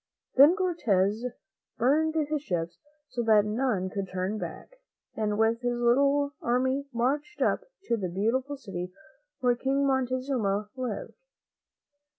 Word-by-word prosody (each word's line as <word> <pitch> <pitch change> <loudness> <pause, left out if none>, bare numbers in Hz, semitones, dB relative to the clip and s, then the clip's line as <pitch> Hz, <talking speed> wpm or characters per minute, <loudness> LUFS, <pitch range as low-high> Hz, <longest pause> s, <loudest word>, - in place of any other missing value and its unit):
Then 290 +7 +8
Cortez 230 - +1 0.5
burned 310 +6 +2
his 305 -1 0
ships 170 - -3 0.3
so 250 -4 -3
that 215 -3 +5
no 225 +6 0
one 190 -6 0
could 195 -1 -4
turn 185 +3 -2
back, - - -8 0.4
and 210 -1 -1
with 225 +2 +2
his 245 -1 -1
little 280 +4 +3
army 260 +3 +1
marched 280 - -1
up - - +1 0.2
to 235 -10 0
the 190 -4 -3
beautiful 245 +10 -1
city 180 -8 -6 0.5
where 250 -1 +4
King 270 +3 0
Montezuma 255 -6 0
lived. 250 -5 -4
245 Hz, 135 wpm, -28 LUFS, 210-275 Hz, 0.5 s, Then